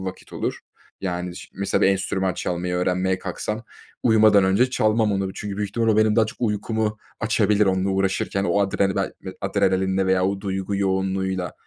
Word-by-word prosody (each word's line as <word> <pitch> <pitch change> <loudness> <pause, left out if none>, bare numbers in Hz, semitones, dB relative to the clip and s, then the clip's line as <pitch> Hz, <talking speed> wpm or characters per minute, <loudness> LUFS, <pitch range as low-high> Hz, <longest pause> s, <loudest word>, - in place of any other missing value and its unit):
vakit 95 0 -8
olur. - - -3 0.4
Yani, 90 -1 -3
şi - - -10
mesela, 100 0 0
bir - - +6
enstrüman 95 -1 0
çalmayı 90 0 -2
öğrenmeye 90 +1 0
kalksam, 105 +5 -4 0.4
uyumadan 110 -3 +5
önce 100 +7 +3
çalmam 110 -3 +2
onu 95 -1 -1
çünkü 100 -2 -5
büyük 105 0 -2
ihtimal 115 +1 0
o 110 - +3
benim 110 -1 +3
daha 110 -1 +4
çok - - -10
uykumu 110 -1 -1 0.2
açabilir 105 -1 +2
onunla 95 0 +1
uğraşırken. 95 0 0
O 100 - +2
adren 95 -1 +1
bel - - -1 0.3
adrenalinle 95 0 +1
veya 95 0 +2
o 100 0 -2
duygu 95 0 -2
yoğunluğuyla 95 -2 -1
95 Hz, 170 wpm, -23 LUFS, 95-105 Hz, 0.4 s, bir